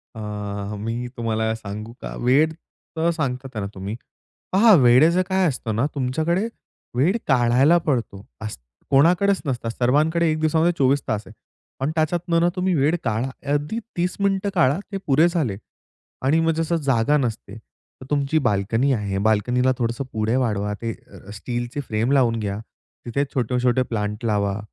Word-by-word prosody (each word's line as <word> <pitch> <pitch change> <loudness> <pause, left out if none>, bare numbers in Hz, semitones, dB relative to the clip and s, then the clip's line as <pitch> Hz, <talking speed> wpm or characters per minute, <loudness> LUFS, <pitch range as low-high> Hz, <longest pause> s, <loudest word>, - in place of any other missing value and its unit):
अ, - - -8 0.7
मी 120 +2 -3
तुम्हाला 110 -1 -1
सांगू 110 +1 -7
का? - - -6
वेळ 145 +6 +4 0.5
तर 165 +1 +2
सांगता 135 -5 -3
आहे 110 - -2
ना 100 - -3
तुम्ही 100 +3 -5 0.6
पहा 215 +4 +6
वेळेचं 145 +9 +5
काय 190 -1 +2
असतं 120 -6 -3
ना 115 +5 +1
तुमच्याकडे 160 - 0 0.5
वेळ 165 - +3
काढायला 130 +5 +4
पडतो. 115 -8 -2 0.2
असं 105 - -6 0.3
कोणाकडेच 175 +8 +4
नसता 120 -4 -2
सर्वांकडे 155 +8 +2
एक 155 - -1
दिवसामध्ये 160 +2 +2
24 135 +1 +3
तास 105 0 -1
आहे - - -12 0.5
पण 135 +3 -1
त्याच्यातनं 170 +2 +1
ना 175 - +4
तुम्ही 185 0 0
वेळ 150 +3 +2
काढा. 115 +2 -1 0.2
अगदी 145 +10 -1 0.2
30 180 +1 0
मिनिटं 200 0 +1
काढा 160 -2 +3
ते 195 - -2
पुरे 150 +4 +5
झाले. 155 - -1 0.7
आणि 145 +5 +3
मग 165 0 +2
जसं 165 +1 0
जागा 130 +4 +3
नसते 115 -6 -3 0.5
तर - - -9
तुमची 145 +1 +1
बाल्कनी 115 +5 +1
आहे, 100 -4 -2
बाल्कनीला 125 +4 +2
थोडंसं 120 +2 -1
पुढे 110 +2 0
वाढवा 105 -5 0
ते 115 -1 -2 0.2
अ, 95 0 -14
स्टीलची 120 +5 -4
फ्रेम 110 +4 0
लावून 120 -5 +3
घ्या. 100 -2 -3 0.5
तिथे 130 +4 0
छोटे-छोटे 125 0 +1
प्लांट 105 0 -3
लावा. 100 -2 0
130 Hz, 160 wpm, -22 LUFS, 115-160 Hz, 0.7 s, पहा